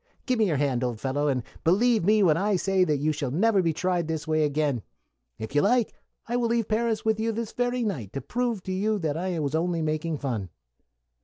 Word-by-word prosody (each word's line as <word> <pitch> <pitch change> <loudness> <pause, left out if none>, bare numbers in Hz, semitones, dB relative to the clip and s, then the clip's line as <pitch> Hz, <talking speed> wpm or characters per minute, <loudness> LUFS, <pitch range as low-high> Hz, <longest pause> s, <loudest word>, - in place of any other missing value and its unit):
Give 255 -3 0
me 220 - +4
your 155 -5 +1
hand, 130 -3 0
old 120 -3 -2
fellow, 145 +3 -1
and 130 -4 0 0.2
believe 220 +5 +3
me 210 +3 +4
when 160 -5 +5
I 200 +4 +1
tell 195 +2 -1
you 185 -1 +4
that 150 -2 +2
you 150 +3 +1
shall 140 -3 -3
never 195 - +3
be 165 -2 +1
tried 175 0 -1
this 160 -1 -3
way 155 -1 +2
again. 145 -4 0 0.6
If 110 +4 -7
you 145 - +4
like, 235 +2 +2 0.3
I 240 +1 0
will 240 -1 +1
leave 230 -2 0
Paris 220 0 0
with 220 -1 +1
you 225 +1 0
this 225 0 -4
very 245 0 -1
night, 135 - -3
to 135 - -3
prove 235 - -2
to 190 - -5
you 210 +3 0
that 155 -6 -2
I 180 +1 -2
was 145 -2 -2
only 165 0 0
making 155 +1 -1
fun." 115 -10 -3
175 Hz, 235 wpm, -26 LUFS, 145-220 Hz, 0.6 s, when